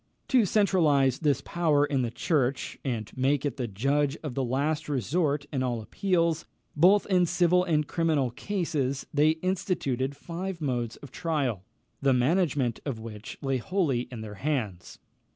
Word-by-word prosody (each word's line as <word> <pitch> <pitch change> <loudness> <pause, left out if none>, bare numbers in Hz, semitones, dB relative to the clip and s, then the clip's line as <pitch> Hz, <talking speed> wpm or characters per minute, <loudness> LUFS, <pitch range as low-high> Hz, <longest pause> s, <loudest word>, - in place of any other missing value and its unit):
To 250 -5 +5
centralise 155 - +3
this 145 -5 +1
power 155 -4 +2
in 140 -3 0
the 120 - -1
Church, 135 +1 -1
and 115 -6 -3
make 135 +2 +1
it 140 -3 -2
the 125 -3 -2
judge 140 +8 0
of 150 -5 -4
the 135 - -1
last 145 +5 -1
resort 145 +2 0
in 135 - 0
all 125 -2 -1
appeals, 170 - 0 0.3
both 185 +7 +5
in 180 -3 +3
civil 180 +1 +3
and 155 -4 +1
criminal 155 -7 +1
cases, 145 - -2
they 155 +2 +3
instituted 140 -8 -1
five 180 +1 -5
modes 120 -6 -2
of 140 - -12
trial, 135 - -2 0.4
the 135 -1 +4
management 135 - +1
of 135 -6 -4
which 110 -1 -8
lay 135 -1 +1
wholly 135 - 0
in 120 -3 -6
their 105 -1 -7
hands. 115 -12 -2
145 Hz, 155 wpm, -28 LUFS, 125-165 Hz, 0.4 s, To